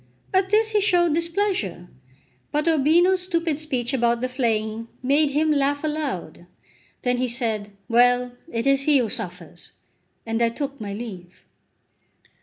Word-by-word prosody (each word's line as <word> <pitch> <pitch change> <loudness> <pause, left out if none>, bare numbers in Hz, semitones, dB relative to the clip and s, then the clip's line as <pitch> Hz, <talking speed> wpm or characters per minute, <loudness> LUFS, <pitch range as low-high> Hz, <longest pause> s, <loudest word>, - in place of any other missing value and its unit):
At 380 0 +2
this 435 +2 +3
he 420 -1 +2
showed 350 -5 +3
displeasure; 335 - -1 0.6
but 300 +2 0
Urbino's 335 +5 +4
stupid 335 -4 -1
speech 260 -5 -2
about 235 -2 +2
the 255 - -1
flaying 225 -3 -1 0.2
made 285 +3 +3
him 305 +2 +1
laugh 285 0 +1
aloud. 275 - -4 0.6
Then 245 0 +1
he 255 +1 0
said: 225 -4 -2 0.2
"Well, 245 +1 +3 0.2
it 230 0 -2
is 275 0 +3
he 295 -2 +5
who 240 -4 +1
suffers!" 180 -2 -5 0.5
and 225 +1 -2
I 235 - +4
took 275 +1 -5
my 205 -1 -5
leave. 190 -6 -9
270 Hz, 145 wpm, -23 LUFS, 230-315 Hz, 0.6 s, he